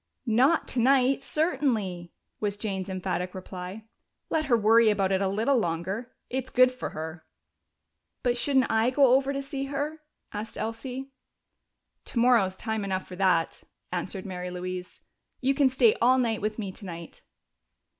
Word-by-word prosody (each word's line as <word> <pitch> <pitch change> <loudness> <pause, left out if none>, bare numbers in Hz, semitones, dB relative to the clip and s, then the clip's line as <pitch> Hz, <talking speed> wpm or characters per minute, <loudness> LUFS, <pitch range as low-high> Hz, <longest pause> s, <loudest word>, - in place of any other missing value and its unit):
"Not 255 +8 +3
tonight, 265 +2 +3
certainly!" 250 - -1 0.3
was 205 -1 -1
Jane's 195 -3 -3
emphatic 185 -1 -3
reply. 185 +3 -7 0.5
"Let 315 -1 +1
her 245 -4 +3
worry 225 +1 +5
about 195 -2 +1
it 190 0 +2
a 195 - +2
little 220 +8 +2
longer 190 +6 -3 0.2
it's 260 0 -3
good 255 0 +5
for 255 0 -5
her." 160 +1 -7 1.0
"But 245 -1 +2
shouldn't 265 0 +2
I 225 +2 +3
go 265 -1 +5
over 270 +1 +3
to 275 0 -3
see 275 0 -4
her?" 290 +3 -3 0.3
asked 215 +1 -5
Elsie. 255 +4 -5 0.9
"Tomorrow's 230 -6 +2
time 220 -2 -2
enough 190 -1 -2
for 180 - -8
that," 180 -4 +2 0.3
answered 185 +1 -4
Mary 180 -2 -5
Louise. 180 0 -6 0.4
"You 265 +1 +2
can 275 -1 +4
stay 250 -4 +4
all 255 +2 +5
night 230 -4 0
with 215 +1 -2
me 200 -4 -4
tonight." 170 -4 -9
220 Hz, 150 wpm, -27 LUFS, 185-260 Hz, 1.0 s, worry